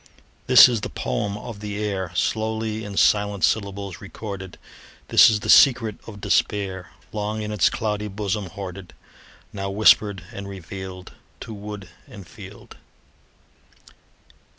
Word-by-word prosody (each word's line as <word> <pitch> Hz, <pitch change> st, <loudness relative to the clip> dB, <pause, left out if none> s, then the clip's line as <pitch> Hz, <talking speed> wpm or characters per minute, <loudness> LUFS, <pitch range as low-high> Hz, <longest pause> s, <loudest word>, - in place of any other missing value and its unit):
This -, -, +9 dB
is 120 Hz, -4 st, -1 dB
the -, -, -4 dB
poem 100 Hz, +12 st, -3 dB
of 105 Hz, 0 st, -8 dB
the 105 Hz, -1 st, -5 dB
air, 100 Hz, -4 st, -3 dB
Slowly 110 Hz, +2 st, -1 dB
in 100 Hz, -1 st, -7 dB
silent 105 Hz, -2 st, +2 dB
syllables 100 Hz, -3 st, -1 dB
recorded; 100 Hz, -3 st, -8 dB, 0.5 s
This -, -, +8 dB
is 105 Hz, -2 st, 0 dB
the -, -, -5 dB
secret 120 Hz, -6 st, +5 dB
of 105 Hz, -3 st, -9 dB
despair, 95 Hz, -3 st, -1 dB, 0.2 s
Long 105 Hz, 0 st, -3 dB
in 105 Hz, -, -4 dB
its 105 Hz, -5 st, +3 dB
cloudy 105 Hz, -1 st, -3 dB
bosom 100 Hz, 0 st, -3 dB
hoarded, 95 Hz, 0 st, -9 dB, 0.6 s
Now 95 Hz, -1 st, -4 dB
whispered 100 Hz, -1 st, +4 dB
and 100 Hz, 0 st, -7 dB
revealed 95 Hz, -1 st, -8 dB, 0.3 s
To 115 Hz, -, -7 dB
wood 105 Hz, -2 st, -8 dB, 0.2 s
and 100 Hz, -3 st, -12 dB
field. 80 Hz, -, -13 dB
100 Hz, 130 wpm, -23 LUFS, 95-105 Hz, 0.6 s, This